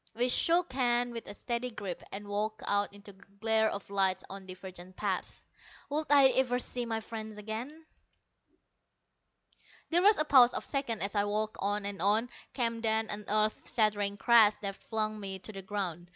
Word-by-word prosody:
We 245 +2 +1
shook 335 +3 +2
hands 245 -2 +1
with 230 - -7
a 205 - -6
steady 240 +2 -2
grip, 200 -6 -6
and 205 +1 -6
walked 210 +1 -3
out 205 0 +1
into 205 0 -13
the 195 - -23 0.2
glare 220 0 +3
of 200 - -6
light, 190 -2 +1
on 195 -1 -9
divergent 185 0 -10
paths. - - -3 0.5
Would 305 +2 -1
I 280 -2 +7
ever 255 -1 +1
see 245 -1 -3
my 225 -1 -1
friend 220 -1 -7
again? 235 +10 -6 2.1
There 345 +2 +4
was 415 +2 +6
a 305 - +2
pause 255 -5 +6
of - - -3
seconds 270 -7 -1
as 200 - -1
I 205 -1 +1
walked 215 +1 -2
on 205 +1 -1
and 200 -3 -5
on; 215 +5 +2 0.2
came 230 -3 -1
then 220 -1 +1
an 210 0 -5
earth 215 +1 +1
shattering 205 -2 +1
crash 225 -2 +6
that 195 -1 -2
flung 215 0 -3
me 195 -2 -5
to 215 +3 -10
the 195 - -7
ground. 185 -3 -4
215 Hz, 180 wpm, -31 LUFS, 200-240 Hz, 2.1 s, I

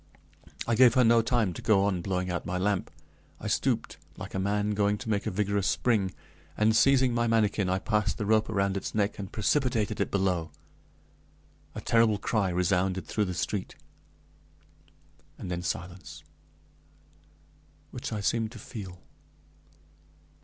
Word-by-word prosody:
I 115 - 0
gave 125 +1 +6
her 130 - +5
no 115 0 +5
time 115 -5 +1
to - - -8
go 100 -3 +3
on 95 -3 0
blowing 90 -1 -2
out 85 - -2
my 90 0 -3
lamp. 100 0 0 0.5
I - - -10
stooped, - - -1 0.2
like - - -8
a 95 - -2
man 105 +2 0
going 105 0 +1
to 115 +1 -7
make 100 -2 -1
a - - +2
vigorous 100 0 0
spring, 105 -6 +1 0.5
and, 110 +1 +3
seizing 130 0 +4
my 120 0 +1
manikin, 105 -4 +1
I 95 - +1
passed 105 -3 0
the 105 - -3
rope 110 +1 +2
around 100 -1 0
its 100 - -4
neck, 105 0 0
and 100 0 -6
precipitated 115 -1 0
it - - 0
below. 90 -4 0 1.3
A - - -5
terrible 115 -2 +3
cry 100 -2 0
resounded 90 +1 0
through 105 - -1
the 90 -1 -4
street, 95 +2 -3 1.6
and 90 - -6
then 90 0 -2
silence, 85 -3 -6 1.7
which - - -6
I 105 -2 -3
seemed 110 +2 0
to - - -9
feel. 95 -5 -9
100 Hz, 155 wpm, -28 LUFS, 95-110 Hz, 1.7 s, gave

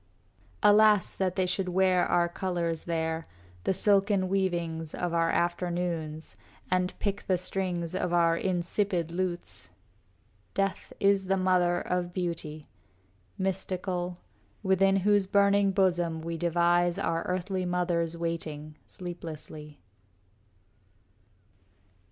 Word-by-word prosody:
Alas, 210 -1 +5
that 185 -2 -1
they 185 - +1
should 185 +1 -1
wear 185 0 +3
our 175 0 +3
colors 175 -3 -2
there, 160 -1 -1 0.4
The - - +2
silken 195 -1 +3
weavings 170 -4 -1
of 175 -1 -2
our 165 0 +2
afternoons, 170 -3 -2 0.4
And 185 0 0
pick 200 -1 -3
the 185 - +3
strings 180 -2 -3
of 180 -1 -1
our 170 -1 +4
insipid 175 -1 -1
lutes! 175 - -3 0.9
Death 195 -1 -1
is 195 -1 +3
the 195 0 +2
mother 180 -2 +2
of 180 -1 -2
beauty, 165 -4 -4 0.7
mystical, 185 -2 -2 0.5
Within 195 0 +3
whose 200 0 +3
burning 200 0 +4
bosom 175 -4 +1
we 165 +1 -4
devise 175 +1 +2
Our 165 -4 0
earthly 185 +1 -1
mothers 170 -2 0
waiting, 155 -3 -4
sleeplessly. 155 -4 -8
180 Hz, 110 wpm, -29 LUFS, 170-190 Hz, 0.9 s, Alas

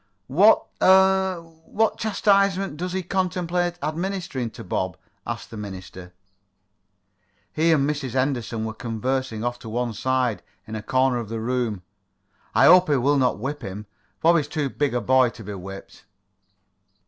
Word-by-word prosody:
"What 190 +12 +5 0.2
er 190 -1 +4
what 165 +7 -2
chastisement 195 -5 +2
does 180 +2 -4
he 190 0 -2
contemplate 180 -1 -1
administering 160 -5 -3
to 115 +1 -10
Bob?" 95 -1 -2 0.3
asked - - -5
the 115 - -8
minister. 95 -3 -8 1.4
He 165 +2 +2
and 140 -3 +3
Mrs. 145 -5 -3
Henderson 125 -4 -1
were 110 - -4
conversing 115 +1 -3
off 120 0 -2
to 115 - -9
one 120 +1 -2
side, 130 0 0 0.2
in 110 - -9
a 110 - -4
corner 130 +3 +1
of 115 -3 -6
the 115 0 -4
room. 115 -5 -2 0.7
"I - - +6
hope 180 -1 +7
he 145 - +4
will 140 +3 +2
not 125 -5 +2
whip 140 +7 -4
him. 100 +3 -7 0.4
Bob 170 +1 +5
is 150 -3 -1
too 145 -3 -2
big 145 -4 -1
a 120 - 0
boy 130 -1 +4
to 115 -1 -12
be 105 +1 -6
whipped." 95 +1 -10
130 Hz, 160 wpm, -24 LUFS, 115-175 Hz, 1.4 s, hope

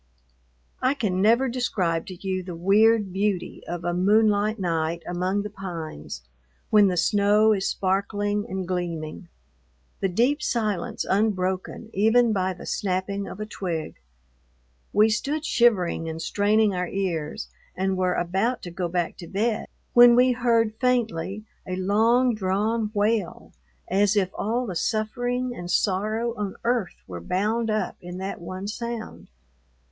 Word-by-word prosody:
I 260 +3 +2
can 190 -8 -1
never 235 +6 +4
describe 190 -10 -1
to 185 - -7
you 185 -1 -1
the 180 -1 -7
weird 205 +3 +3
beauty 195 -2 -1
of 175 0 -4
a 175 0 -1
moonlight 210 +3 +3
night 165 -3 -1
among 185 +3 -1
the 210 - -5
pines 170 - -7 0.5
when 210 -2 +6
the 180 -2 0
snow 205 +4 +4
is 195 -2 0
sparkling 205 +2 -1
and 190 -1 -3
gleaming, 170 -2 -4 0.7
the 195 - 0
deep 250 - +2
silence 215 -9 -1
unbroken 190 +1 -1
even 225 +3 +4
by 190 -2 0
the 180 - -9
snapping 195 +1 -2
of - - -8
a 215 - -3
twig. 175 -6 -4 0.9
We 210 +1 +5
stood 290 +8 -1
shivering 185 - +2
and 160 0 -5
straining 205 +3 +2
our 180 -1 -1
ears 170 -6 -3 0.3
and 190 +1 0
were 185 -1 +1
about 195 +8 0
to 175 - -6
go 175 +1 -2
back 175 -1 -2
to 170 - -9
bed 215 +4 -1 0.3
when 240 0 +8
we 250 +1 +5
heard 230 -3 +2
faintly 220 -6 0 0.2
a 185 - -2
long 225 +6 +3
drawn 215 +2 0
wail 205 -2 -1 0.3
as 200 +3 +2
if 190 -3 +1
all 235 +4 -1
the 190 -6 -5
suffering 245 +6 -1
and 175 0 -7
sorrow 215 +5 0
on 205 -2 -3
earth 235 -5 0
were 90 -2 -7
bound 215 - 0
up 215 0 -1
in 180 0 -7
that 190 -1 -5
one 185 +3 -6
sound. 235 +1 -6
200 Hz, 145 wpm, -25 LUFS, 180-220 Hz, 0.9 s, when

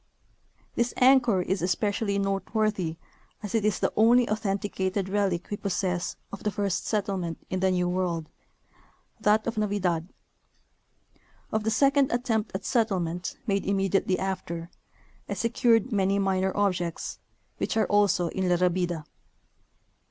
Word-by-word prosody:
This 235 +1 0
anchor 250 -7 +5
is 190 0 -1
especially 200 +3 0
noteworthy 195 -3 -1 0.5
as 210 - -5
it 225 -2 +2
is 210 -3 +2
the - - 0
only 235 +3 +5
authen 215 -3 -1
ticated 190 -1 -2
relic 195 -4 0
we 205 - -1
possess 180 -3 -2 0.2
of 200 - -6
the 210 - 0
first 200 -2 -2
settlement 195 -6 -1
in 185 - 0
the 190 0 +2
New 180 -1 +1
World 175 -3 -1 0.5
— - - -34
that 215 +1 +3
of 230 -2 -2
Navidad. 190 -5 -1 1.4
Of 220 0 0
the - - +2
second 275 +4 +3
attempt 230 -4 0
at 195 +1 -4
settlement, 185 -7 -1
made 200 -3 0
immediately 195 -1 +1
after, 175 -3 -4 0.6
I - - -2
secured 230 0 +2
many 195 -1 +2
minor 190 -1 +1
objects, 180 -5 -1 0.4
which - - -1
are 220 - +3
also 200 -4 +2
in 190 -1 -1
La 175 - +4
Rabida. 175 -2 0
195 Hz, 140 wpm, -27 LUFS, 180-215 Hz, 1.4 s, anchor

